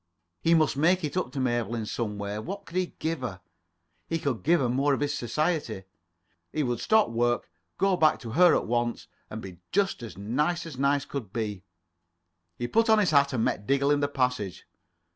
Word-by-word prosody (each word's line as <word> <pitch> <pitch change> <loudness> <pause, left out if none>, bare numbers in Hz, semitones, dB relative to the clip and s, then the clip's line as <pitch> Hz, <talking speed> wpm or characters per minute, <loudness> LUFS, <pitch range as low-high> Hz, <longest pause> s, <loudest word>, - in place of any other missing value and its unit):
He 165 +1 +4
must 155 -3 +3
make 175 +6 +3
it 150 -2 -3
up 185 - -1
to 140 - -4
Mabel 120 -3 0
in 110 -2 -3
some 105 -1 -3
way. 100 +1 -4
What 195 - -6
could 170 - -12
he 185 -1 -1
give 160 -2 -2
her? 100 -7 -4 0.7
He 165 - -1
could 140 -7 -2
give 170 +2 +3
her 130 - +1
more 135 +3 +2
of - - -5
his 145 0 0
society. 145 - -1 0.7
He 155 - 0
would 120 -2 -1
stop 220 - +3
work, 120 -4 0 0.3
go 195 -1 +3
back 155 -3 +4
to 115 -3 -7
her 175 +6 +6
at - - 0
once, 120 0 -1 0.2
and 110 +1 -7
be 90 -3 -9
just 195 -7 +1
as 115 -5 -8
nice 150 - -1
as 150 -6 -8
nice 140 0 +2
could 120 -9 -6
be. 105 -4 -3 0.9
[Pg 120 0 -3
24]He - - -24
put 225 +1 +4
on 220 - +6
his 205 -5 +3
hat, 140 -1 +4
and 115 -3 +1
met 100 - -2
Diggle 140 +1 +3
in 145 - +3
the 145 - +1
passage. 125 -9 -1
140 Hz, 215 wpm, -27 LUFS, 115-165 Hz, 0.9 s, her